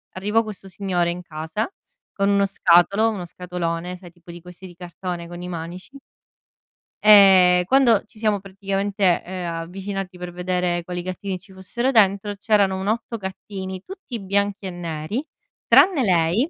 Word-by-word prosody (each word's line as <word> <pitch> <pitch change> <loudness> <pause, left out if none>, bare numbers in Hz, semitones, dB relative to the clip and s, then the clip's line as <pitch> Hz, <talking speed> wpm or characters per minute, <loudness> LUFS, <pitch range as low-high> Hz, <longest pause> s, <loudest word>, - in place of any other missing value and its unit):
arrivò 210 +4 +1
questo 205 -3 -9
signore 180 -2 -1
in 180 +1 -6
casa 160 +6 -4 0.4
con 200 0 +1
uno 200 0 +3
scatolo 195 +3 +3
uno 200 -5 -4
scatolone, 180 0 -4
sai 175 -1 -14
tipo 175 0 -15
di 175 - -10
questi 180 +2 -13
di 175 - -13
cartone 175 0 -6
con 175 0 -9
i 180 - -6
manici 175 +9 -7 1.1
e 190 -4 +7
quando 250 -6 +4
ci 215 +1 -22
siamo 215 -2 +1
praticamente, 195 -1 -1
ehm, 180 -2 -5
avvicinati 190 +1 -6
per 180 0 -7
vedere 180 -1 -1
quali 180 +1 -5
gattini 185 +1 -4
ci 190 +2 -18
fossero 235 +8 -2
dentro, 205 -2 +3
c'erano 200 -2 +2
un 190 - -4
8 230 +2 -2
gattini 190 -1 -7
tutti 370 - -8
bianchi 200 +1 -1
e 190 - -3
neri, 175 - -4 0.4
tranne 365 -7 +6
lei, 180 - +2
190 Hz, 155 wpm, -22 LUFS, 175-205 Hz, 1.1 s, e